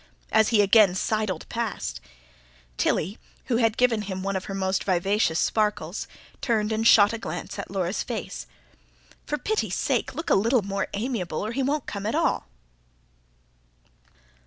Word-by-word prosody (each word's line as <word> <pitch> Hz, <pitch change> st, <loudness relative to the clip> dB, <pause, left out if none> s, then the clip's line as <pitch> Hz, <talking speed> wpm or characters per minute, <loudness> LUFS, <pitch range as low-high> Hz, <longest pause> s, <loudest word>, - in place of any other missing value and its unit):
as 220 Hz, -1 st, +5 dB
he 215 Hz, -3 st, +4 dB
again 200 Hz, -2 st, +5 dB
sidled 210 Hz, -3 st, -1 dB
past, 215 Hz, -, -3 dB, 0.7 s
Tilly, 190 Hz, -, 0 dB, 0.3 s
who 235 Hz, -, +1 dB
had 225 Hz, -2 st, +2 dB
given 245 Hz, -3 st, +3 dB
him 190 Hz, -2 st, -5 dB
one 195 Hz, 0 st, -1 dB
of 190 Hz, -, -3 dB
her 195 Hz, -, -5 dB
most 190 Hz, 0 st, 0 dB
vivacious 185 Hz, -2 st, +1 dB
sparkles, 210 Hz, -5 st, 0 dB, 0.3 s
turned 220 Hz, -3 st, +1 dB
and 220 Hz, +1 st, +2 dB
shot 205 Hz, -1 st, +7 dB
a 230 Hz, -, -3 dB
glance 215 Hz, -, -6 dB
at 200 Hz, -, -5 dB
Laura's 190 Hz, 0 st, -1 dB
face. -, -, -5 dB, 0.8 s
"For 295 Hz, -, -1 dB
pity's 435 Hz, +7 st, -1 dB
sake, -, -, 0 dB
look 325 Hz, -1 st, -3 dB
a -, -, +7 dB
little 225 Hz, +3 st, +3 dB
more 195 Hz, 0 st, -2 dB
amiable, 205 Hz, -6 st, -2 dB
or 215 Hz, -, -3 dB
he 270 Hz, -, -1 dB
won't 280 Hz, +1 st, 0 dB
come 200 Hz, 0 st, -4 dB
at 220 Hz, -, -1 dB
all." -, -, +1 dB
210 Hz, 160 wpm, -25 LUFS, 190-230 Hz, 0.8 s, shot